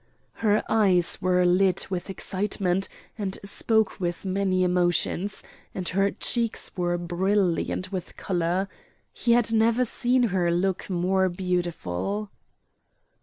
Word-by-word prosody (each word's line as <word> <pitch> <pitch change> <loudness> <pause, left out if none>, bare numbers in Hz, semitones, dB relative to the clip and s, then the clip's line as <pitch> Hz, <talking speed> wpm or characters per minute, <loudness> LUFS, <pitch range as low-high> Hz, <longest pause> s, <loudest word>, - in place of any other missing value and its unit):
Her 215 -1 +3
eyes 190 -6 +2
were 180 0 +3
lit 185 +1 +2
with 185 +1 -3
excitement, 195 -1 -1 0.3
and 195 -2 -2
spoke 220 +2 +1
with 175 0 -3
many 190 -1 +1
emotions, 180 +2 +1 0.3
and 185 -2 -3
her 195 +2 +2
cheeks 230 +2 -2
were 175 -2 0
brilliant 185 +1 0
with 185 -3 -6
color. 180 +1 -1 0.5
He 235 - +2
had 235 -2 +3
never 230 +3 +3
seen 245 +2 +2
her 175 -2 +2
look 185 +3 0
more 185 +1 +1
beautiful. 180 - -2
190 Hz, 120 wpm, -26 LUFS, 175-205 Hz, 0.5 s, Her